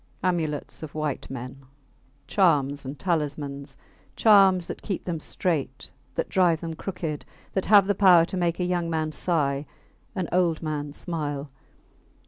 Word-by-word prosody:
Amulets 165 -5 -1
of 155 -2 -8
white 155 -3 -3
men! 135 +1 -7 0.6
Charms 145 -7 +2
and 135 +2 -6
talismans! 145 -5 -2 0.4
Charms 195 -5 +6
that - - -7
keep 195 -4 -3
them 170 -3 -2
straight, 145 -6 -2 0.2
that - - -1
drive 175 -4 +3
them 165 -1 -4
crooked, 160 -3 -4 0.3
that 190 - 0
have 205 -2 +7
the 205 - +2
power 180 -4 +6
to 185 - -6
make 175 -1 0
a 180 - +1
young 175 -2 -1
man 160 -1 -1
sigh, 145 -4 0 0.5
an 185 -4 -1
old 175 -3 +1
man 150 -2 -3
smile. 145 -3 -4
160 Hz, 145 wpm, -26 LUFS, 145-180 Hz, 0.6 s, have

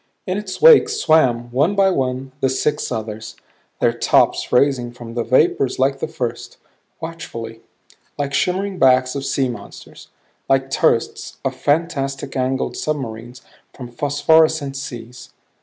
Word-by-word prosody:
In 185 +1 -2
its 200 -3 -7
wake 460 -2 +7
swam, 130 - +2
one 145 +11 +1
by 195 -1 +4
one, 130 -3 -2 0.2
six 145 +3 -1
others 110 -1 -5 0.4
their - - +2
tops - - +2
raising 125 -2 +2
from 120 -1 -10
the 120 0 -1
vapors 130 +2 +2
like 135 +1 +1
the - - -2
first, 125 -7 -5 0.4
watchfully; 115 -9 -7 0.6
like 140 -1 -3
shimmering 185 +4 -1
backs 130 -1 +4
of 140 -1 -4
sea 135 -1 0
monsters; 120 -5 -10 0.4
like 135 0 +1
turrets 115 -2 0
of 130 -1 -1
fantastic 140 -1 -1
angled 130 0 -1
submarines 120 -4 -5 0.3
from 125 -2 -9
phosphorescent 145 +1 +2
seas. 120 -3 -8
135 Hz, 130 wpm, -20 LUFS, 120-155 Hz, 0.6 s, wake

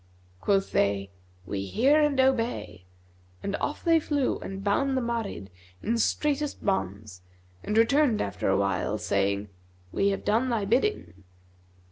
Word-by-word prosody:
Quoth 195 - +1
they, 100 -1 +1 0.3
'We 95 +1 -3
hear 275 - +3
and 295 -3 +2
obey,' 240 - 0 0.6
and 200 - -2
off 295 - -3
they 330 -1 +4
flew 290 -3 0
and 195 0 -7
bound 265 +7 +1
that - - +1
Marid 230 - -3 0.3
in 230 +1 0
straitest 295 +4 0
bonds 100 - -2 0.4
and 210 - -2
returned 250 +1 +4
after 95 -2 -2
a 95 - +3
while, 100 +1 0
saying, 100 0 0 0.4
'We 200 - +2
have 195 - -3
done 225 +5 +2
thy 225 -4 0
bidding.' 95 - 0
200 Hz, 140 wpm, -27 LUFS, -, 0.6 s, they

